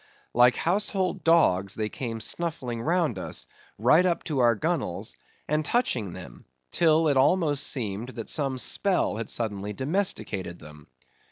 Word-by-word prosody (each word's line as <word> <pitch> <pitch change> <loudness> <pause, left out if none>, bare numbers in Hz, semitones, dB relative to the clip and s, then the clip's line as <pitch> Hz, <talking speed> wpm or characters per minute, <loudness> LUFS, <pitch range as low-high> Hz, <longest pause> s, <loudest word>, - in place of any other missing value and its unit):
Like 125 +1 +5
household 190 0 0
dogs 100 - +3
they 110 -1 -2
came 115 -2 -5
snuffling 130 -7 -2
round 160 - 0
us, - - -4 0.3
right 130 - +5
up 175 -2 0
to 150 -5 -2
our 120 -2 +4
gunwales, 105 - -2 0.3
and 155 +1 +1
touching 130 - 0
them; - - -11 0.3
till 160 -1 +3
it 140 -2 +2
almost 145 0 +2
seemed 110 -2 -3
that 115 -2 -6
some 135 -4 -1
spell 185 - 0
had 115 -1 -5
suddenly 105 -3 -3
domesticated 130 - -1
them. 75 -1 -14
130 Hz, 145 wpm, -26 LUFS, 110-165 Hz, 0.3 s, Like